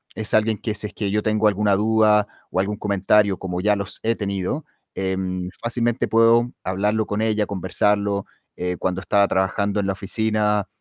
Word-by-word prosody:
Es 110 -1 -2
alguien 110 0 +3
que 110 - -3
si 105 0 -1
es - - -14
que 100 -2 -3
yo 105 +1 +1
tengo 110 0 +2
alguna 105 0 +2
duda 105 0 +3 0.2
o 90 - -1
algún 105 +2 -1
comentario, 100 0 +2
como 90 -1 -4
ya 105 +1 +3
los 100 0 -3
he 115 +1 +1
tenido, 100 - -3 0.3
em, 95 -1 -2
fácilmente 120 +1 0
puedo 115 +1 +4
hablarlo 105 +4 0
con 105 +1 -2
ella, 110 -1 +1
conversarlo. 100 +1 0 0.3
Eh, 90 0 -2
cuando 95 0 -2
estaba 100 +1 +3
trabajando 100 +2 0
en 100 - -1
la 95 - 0
oficina, 105 0 0
105 Hz, 180 wpm, -22 LUFS, 95-110 Hz, 0.3 s, puedo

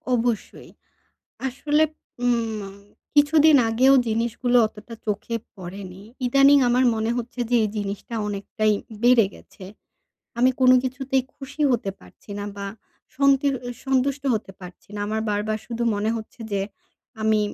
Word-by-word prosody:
অবশ্যই। 230 -2 -2 0.8
আসলে 295 +4 +1 0.4
উম 225 -5 -1 0.4
কিছুদিন 300 +1 +6
আগেও 260 +4 +5
জিনিসগুলো 235 +2 +1
অতটা 220 +2 -12
চোখে 215 +2 -2 0.2
পড়েনি 185 0 -9 0.2
ইদানিং 275 +3 +6
আমার 250 +2 +3
মনে 220 +1 -1
হচ্ছে 245 +1 -6
যে 245 - +3
এই 210 - 0
জিনিসটা 205 +3 -4
অনেকটাই 210 +1 0 0.3
বেড়ে 240 -4 +6
গেছে। 185 - -14 0.7
আমি 250 +2 +5
কোনো 255 0 +6
কিছুতেই 260 0 -1
খুশি 285 +2 -8
হতে 200 -5 0
পারছি - - -20
না 205 - -4
বা 200 - -4 0.5
সঙ্কির 275 0 +3
অ - - -3 0.2
সন্তুষ্ট 270 +1 +1
হতে 210 -3 -3
পারছি 180 +2 -12
না। - - -4
আমার 220 +1 -1
বারবার 210 +1 -1
শুধু 235 0 -3
মনে 210 +2 -1
হচ্ছে 225 +1 -8
যে 200 -1 0 0.6
আমি 220 -1 +3
230 Hz, 135 wpm, -23 LUFS, 210-260 Hz, 0.8 s, কিছুদিন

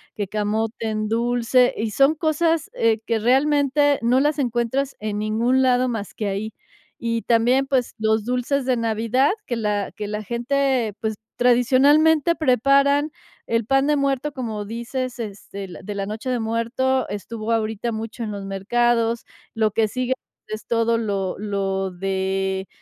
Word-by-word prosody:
que 205 -2 -3
camote 215 +3 -2
en 215 -1 -1
dulce, 240 +2 +2
y 220 +1 -2
son 275 +7 +4
cosas, 320 0 0
eh, 225 -1 +2
que 230 - +1
realmente 285 +4 +3
no 245 +3 +4
las 295 +2 +1
encuentras 255 +1 -1
en 210 -1 -3
ningún 230 +5 +1
lado 255 0 +3
más 220 -4 -4
que 210 - -3
ahí, 205 +2 -3 0.5
y 230 -1 -2
también, 240 +4 +3
pues, 265 -3 0
los 220 0 +1
dulces 250 +3 -1
de 255 -1 +1
Navidad 230 - +1 0.2
que 240 - -1
la 210 -3 -1
que 210 - -5
la 210 +1 -3
gente, 240 +1 0
pues, 220 -1 -1 0.2
tradicionalmente 280 +6 +4
preparan, 280 +2 +3 0.4
el 230 -1 0
pan 270 +3 +2
de 300 - +3
muerto, 275 0 0
como 225 -6 -4
dices, 235 +4 -4
este, 200 -3 -7
la 175 - -10
de 205 +2 -6
la 200 -1 -2
noche 215 +5 -5
de 250 -1 0
muerto, 230 +4 0
estuvo 215 +3 -5
ahorita 225 0 -1
mucho 225 +2 -6
en 220 - -3
los 200 -1 -6
mercados. 230 +4 +1 0.3
Lo 220 -1 +2
que 220 +1 +2
sigue 255 +4 -1 0.4
es 215 0 -6
todo 230 0 +1
lo 200 -4 -2
lo 195 -2 -1
de 190 +1 -2
230 Hz, 160 wpm, -22 LUFS, 215-260 Hz, 0.5 s, son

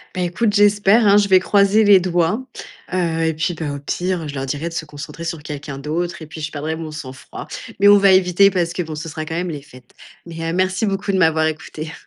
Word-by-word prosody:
Beh 180 -1 -1
écoute, 205 +5 0
j'espère, 205 +2 +4
hein, 200 0 +6
je 205 -1 +2
vais 190 -1 +6
croiser 200 +3 +3
les 200 -2 +7
doigts, 180 +7 0 0.5
heu, 165 -3 0
et 160 - 0
puis 165 +3 -1
bah, 155 -3 -4
au - - -5
pire, 175 +4 -3
je 145 - -6
leur 135 0 -4
dirais 150 +5 -3
de 165 - -10
se 160 - -4
concentrer 150 +3 -9
sur 165 -2 -5
quelqu'un 145 -2 -7
d'autre 165 +4 -4
et - - -8
puis 150 +1 -10
je 155 0 -4
perdrai 155 +2 -4
mon 160 -1 -6
sang-froid. 135 -4 -9 0.3
Mais 200 +1 +5
on 205 0 +8
va 195 -1 +5
éviter 185 +1 +4
parce 175 -3 -1
que, 180 - -2
bon, 160 -2 -7
ce 155 +2 -6
sera 155 0 -6
quand 160 - -5
même 175 +1 -2
les 150 -3 -5
fêtes. 130 -3 -17 0.3
Mais, 165 -1 -6
heu, - - -3
merci 185 +3 0
beaucoup 195 0 -2
de 190 - +1
m'avoir 160 -3 +3
écoutée. 155 0 -5
170 Hz, 250 wpm, -19 LUFS, 155-190 Hz, 0.5 s, on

